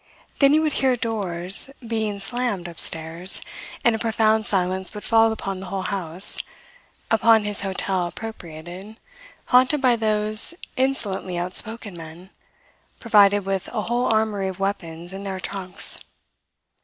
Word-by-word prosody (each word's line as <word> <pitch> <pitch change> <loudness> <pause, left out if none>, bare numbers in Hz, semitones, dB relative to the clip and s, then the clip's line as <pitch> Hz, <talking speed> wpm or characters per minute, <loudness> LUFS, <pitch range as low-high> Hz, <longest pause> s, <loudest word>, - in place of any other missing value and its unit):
Then 275 -1 +6
he 310 - +5
would 310 -2 0
hear 260 -2 +3
doors 200 -3 0 0.2
being 220 -3 -1
slammed 205 -3 -1
upstairs; 165 +1 0 0.5
and 235 -2 +5
a - - -4
profound 220 -1 +2
silence 190 0 0
would 210 - -7
fall 225 -1 +4
upon 195 -3 -4
the 190 - -8
whole 190 +1 -3
house, 185 -1 0 0.7
upon 225 -1 +5
his 205 -1 0
hotel 190 -2 -1
appropriated, 180 0 -9 0.5
haunted 255 +4 +4
by 255 -3 +4
those 215 +5 +1 0.2
insolently 210 -9 -1
outspoken 200 +3 -1
men 170 +3 -11 0.7
provided 205 -3 +4
with 195 -1 -2
a 215 -3 -2
whole 240 +3 0
armoury 215 -3 +1
of 190 -1 -6
weapons 175 -3 -4
in 195 +1 -7
their 190 -1 -4
trunks. 185 -1 +1
200 Hz, 135 wpm, -23 LUFS, 185-225 Hz, 0.7 s, Then